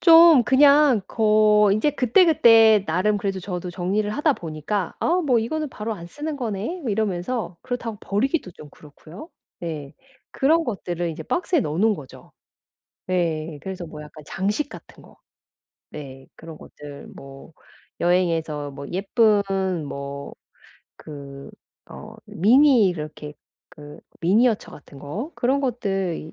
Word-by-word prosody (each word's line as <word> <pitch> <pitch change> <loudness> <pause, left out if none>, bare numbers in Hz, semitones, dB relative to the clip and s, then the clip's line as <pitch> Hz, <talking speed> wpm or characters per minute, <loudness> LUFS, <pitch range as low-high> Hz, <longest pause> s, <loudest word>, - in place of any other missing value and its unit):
좀 330 -5 +8
그냥 280 -3 +5
거 215 -1 +3
인제 215 +9 +1
그때그때 235 - +5
나름 195 +6 +1
그래도 195 -1 -3
저도 180 -1 -5
정리를 195 +4 -2
하다 295 +6 +1
보니까 165 - -4
'아 345 - +1
뭐 260 -7 +2
이거는 305 +7 -3
바로 220 -2 -5
안 170 -4 -10
쓰는 295 - -6
거네.' 230 - -4
뭐 250 -7 -3
이러면서 195 -2 -2
그렇다고 235 -4 -5
버리기도 230 - -1
좀 150 -2 -14
그렇고요. 160 - -14 0.3
예 150 -4 -6 0.4
그런 320 +4 +2
것들을 175 -6 -4
인제 155 - -7
박스에 355 -3 0
넣어 150 -6 -3
놓은 215 +4 +3
거죠. 140 -8 -13 0.8
네 165 -4 -2
그래서 185 -2 -6
뭐 150 -1 -10
약간 150 0 -13
장식 205 +10 -2
같은 - - -13
거 - - -19 0.8
네 135 -3 -10
그런 165 -1 -11
것들 145 -1 -12
뭐 135 +3 -13 0.5
여행에서 165 -4 0
뭐 140 0 -9
예쁜 205 +2 +2 0.4
뭐 140 0 -7 0.6
그 140 -2 -10 0.4
어 - - -11
미니 240 - +4
이렇게 150 -3 -6 0.4
그 150 -4 -13 0.2
미니어처 215 +6 +2
같은 140 -1 -14
거 200 - -6
그런 270 +3 +1
것들 195 - -2
이 155 - -10
195 Hz, 270 characters per minute, -23 LUFS, 160-245 Hz, 0.8 s, 좀